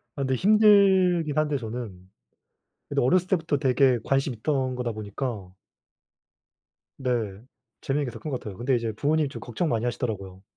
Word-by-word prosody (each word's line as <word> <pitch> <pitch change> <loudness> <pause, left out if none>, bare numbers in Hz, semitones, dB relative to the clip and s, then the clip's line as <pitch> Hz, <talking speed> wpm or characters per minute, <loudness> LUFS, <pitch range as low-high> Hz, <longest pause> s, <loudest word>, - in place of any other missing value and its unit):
아 140 - -4
근데 130 -1 0
힘들긴 190 - +4
한데 150 -2 +1
저는 110 -6 -7 0.8
근데 - - 0
어렸을 180 +8 +2
때부터 165 -6 0
되게 130 -2 +3
관심 135 -2 0
있던 130 +1 -1
거다 125 -1 -2
보니까 105 -2 -5 1.5
네. 115 -7 -2 0.4
재밌는 145 +1 -1
게 125 - -5
더 - - -8
큰 155 - -6
것 130 - -2
같아요. 100 -3 -8
근데 125 +2 +1
이제 115 -2 -1
부모님이 150 +4 +1
좀 - - -8
걱정 125 +8 -3
많이 115 -3 0
하시더라고요. 100 -6 -4
130 Hz, 335 characters per minute, -26 LUFS, 115-155 Hz, 1.5 s, 힘들긴